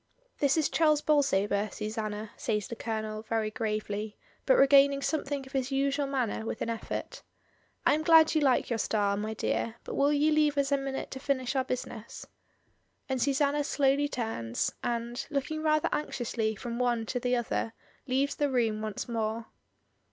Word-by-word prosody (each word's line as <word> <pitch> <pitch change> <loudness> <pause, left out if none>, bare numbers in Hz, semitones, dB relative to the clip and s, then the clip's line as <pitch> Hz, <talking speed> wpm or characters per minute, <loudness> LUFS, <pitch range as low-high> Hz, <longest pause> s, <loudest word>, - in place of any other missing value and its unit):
"This 280 +1 +3
is 310 - +3
Charles 305 -2 +3
Bolsover, 210 -9 +2
Susanna," 215 0 -4
says 210 -2 -2
the 235 - -6
Colonel, 215 -1 -4
very 220 -1 -1
gravely, 215 -1 -3 0.3
but - - +6
regaining 275 0 +6
something 285 -3 -2
of 265 - -13
his 265 -1 -1
usual 275 +1 +1
manner 255 -5 -1
with 225 - -3
an 230 - -2
effort 230 - -5 0.6
"I - - +5
am 305 - +1
glad 320 0 +6
you 310 - +2
like 265 -3 +3
your 230 - 0
star, 205 -2 +1
my 215 +2 -3
dear, 225 +1 -1
but - - -6
will 285 +1 +3
you 295 +1 +3
leave 300 -1 +3
us 280 0 +1
a 280 - +4
minute 270 0 -4
to 265 - -6
finish 265 -1 -1
our 265 - +2
business?" 240 -3 -5 0.8
And 260 -2 -1
Susanna 285 +2 +2
slowly 280 0 +2
turns, 220 - -2
and, 235 0 -2
looking 295 +2 -2
rather 310 -1 +2
anxiously 230 -6 -2
from 235 +3 -5
one 240 -2 +1
to 245 - -2
the 250 +1 +1
other, 230 -1 -2 0.3
leaves 270 +2 +1
the 290 -1 0
room 225 -5 +1
once 215 -2 -4
more. 225 -1 -2
250 Hz, 175 wpm, -29 LUFS, 220-280 Hz, 0.8 s, but